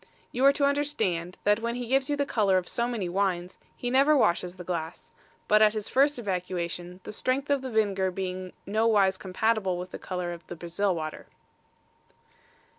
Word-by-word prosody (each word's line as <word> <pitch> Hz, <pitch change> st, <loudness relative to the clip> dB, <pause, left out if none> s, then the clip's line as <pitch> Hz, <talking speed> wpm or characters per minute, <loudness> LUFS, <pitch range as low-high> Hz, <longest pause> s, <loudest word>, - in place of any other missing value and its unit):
You 250 Hz, -, -1 dB
are 275 Hz, -, +7 dB
to 280 Hz, -, +2 dB
understand, 225 Hz, -, -1 dB
that 210 Hz, +1 st, +3 dB
when 235 Hz, +1 st, -2 dB
he 245 Hz, 0 st, -4 dB
gives 265 Hz, +3 st, +1 dB
you 290 Hz, -, +2 dB
the 285 Hz, 0 st, 0 dB
colour 200 Hz, -7 st, +2 dB
of 180 Hz, -1 st, -2 dB
so 235 Hz, 0 st, -1 dB
many 225 Hz, -7 st, -2 dB
wines, 180 Hz, -1 st, -1 dB, 0.2 s
he 245 Hz, -, -3 dB
never 280 Hz, +3 st, +5 dB
washes 180 Hz, -6 st, +1 dB
the 180 Hz, -, -8 dB
glass, 170 Hz, -2 st, -5 dB, 0.4 s
but 215 Hz, 0 st, +5 dB
at 215 Hz, 0 st, +5 dB
his 215 Hz, -1 st, -3 dB
first 280 Hz, +2 st, +3 dB
evacuation, 180 Hz, -3 st, -4 dB
the -, -, -7 dB
strength 270 Hz, +6 st, -1 dB
of 280 Hz, -2 st, +2 dB
the 260 Hz, -, -5 dB
vinegar 200 Hz, -4 st, +1 dB
being 185 Hz, 0 st, -5 dB
no 220 Hz, +3 st, +1 dB
wise 195 Hz, -4 st, +3 dB
compatible 190 Hz, -1 st, 0 dB
with 180 Hz, +1 st, -6 dB
the -, -, -7 dB
colour 180 Hz, -2 st, -4 dB
of 170 Hz, -, -12 dB
the 175 Hz, -, -6 dB
Brazil 175 Hz, +3 st, -1 dB
water. 155 Hz, -1 st, -5 dB
200 Hz, 190 wpm, -27 LUFS, 180-245 Hz, 0.4 s, are